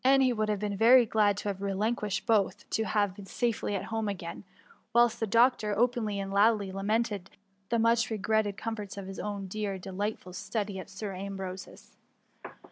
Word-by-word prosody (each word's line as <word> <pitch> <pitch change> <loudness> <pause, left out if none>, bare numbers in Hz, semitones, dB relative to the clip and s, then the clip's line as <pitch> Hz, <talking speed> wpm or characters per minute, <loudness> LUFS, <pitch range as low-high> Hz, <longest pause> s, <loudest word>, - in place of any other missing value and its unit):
he 265 -1 +5
would 215 -1 -1
have 210 - +1
been 205 0 -2
very 240 +4 +7
glad 210 -2 +2
to 205 - -4
have 195 -1 -3
relinquished 205 +1 -1
both, 215 -4 +1
to 220 - +1
have 205 -3 +1
been 200 -1 -10
safely 230 -3 -1
at 190 - -2
home 220 -1 -1
again; 175 -4 -6 0.5
whilst 235 0 +4
the 225 - 0
doctor 230 -2 +3
openly 225 -3 +1
and 195 0 -4
loudly 205 -1 +3
lamented 205 0 -1 0.4
the 235 - +2
much 230 +1 +3
regretted 215 -1 0
comforts 210 -4 -5
of 200 - -5
hi$ 195 0 -6
own 205 -1 -4
dear 200 0 -3
de 190 +1 -8
lightful 200 -1 -4
study 205 0 -3
at 185 - -9
Sir 200 +1 -5
Ambrose'^s. 190 -1 -7
210 Hz, 180 wpm, -29 LUFS, 195-225 Hz, 0.5 s, very